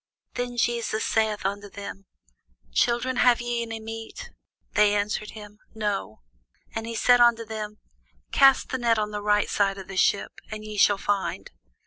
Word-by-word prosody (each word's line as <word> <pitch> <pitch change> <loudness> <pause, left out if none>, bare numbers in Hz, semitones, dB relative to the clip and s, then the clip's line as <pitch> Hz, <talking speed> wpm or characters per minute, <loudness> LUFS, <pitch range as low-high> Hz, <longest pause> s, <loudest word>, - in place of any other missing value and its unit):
Then 245 0 -4
Jesus 235 -2 0
saith 220 -2 0
unto 200 +1 -3
them, 200 -1 -9 0.7
Children, 240 - +1
have 245 -1 +5
ye 240 0 -2
any 225 -1 -5
meat? 225 - -8 0.4
They 210 -1 +4
answered 210 +1 -1
him, 210 0 -11 0.2
No. 205 - -3 0.5
And 225 0 -4
he 230 - -5
said 245 +2 +5
unto 235 -1 +4
them, 215 -1 -6 0.5
Cast 275 -1 +5
the 260 - -2
net 235 -2 +2
on 210 0 -1
the 210 0 -4
right 210 0 +2
side 195 -1 +1
of 195 - -9
the 195 0 -7
ship, 200 +2 +2 0.2
and 215 -1 -7
ye 215 0 -7
shall 205 0 +4
find. 200 0 -2
215 Hz, 165 wpm, -25 LUFS, 205-235 Hz, 0.7 s, have